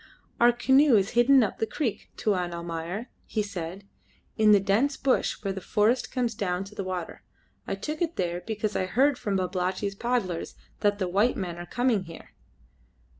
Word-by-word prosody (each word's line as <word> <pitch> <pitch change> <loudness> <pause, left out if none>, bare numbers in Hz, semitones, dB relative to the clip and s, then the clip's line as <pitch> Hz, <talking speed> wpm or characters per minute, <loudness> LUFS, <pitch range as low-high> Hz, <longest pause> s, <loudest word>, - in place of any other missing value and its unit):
"Our 240 0 +7
canoe 265 +2 +4
is 200 -1 +2
hidden 250 +2 +5
up 210 - -3
the 225 - 0
creek, 240 -5 -3
Tuan 180 -6 0
Almayer," 170 +6 -5 0.2
he 215 - -1
said, 195 0 -6 0.5
"in 215 -1 +5
the 205 - +7
dense 210 +9 +1
bush 270 -2 +1
where 195 -1 -1
the 190 - -6
forest 220 +7 +1
comes 245 -3 -1
down 185 -3 -2
to 195 +2 -12
the 200 - -4
water. 185 -3 -5 0.5
I - - -1
took 305 +1 -5
it 340 -1 0
there 175 -1 -2
because 215 -1 -2
I 185 - 0
heard 265 +6 +2
from 210 -5 -1
Babalatchi's 185 +2 -1
paddlers 200 -6 -2 0.2
that 205 -1 +2
the 190 -3 -1
white 205 +7 +2
men 175 -2 -4
are 175 - -7
coming 240 -3 +1
here." 165 -1 -12
205 Hz, 180 wpm, -27 LUFS, 185-240 Hz, 0.5 s, Our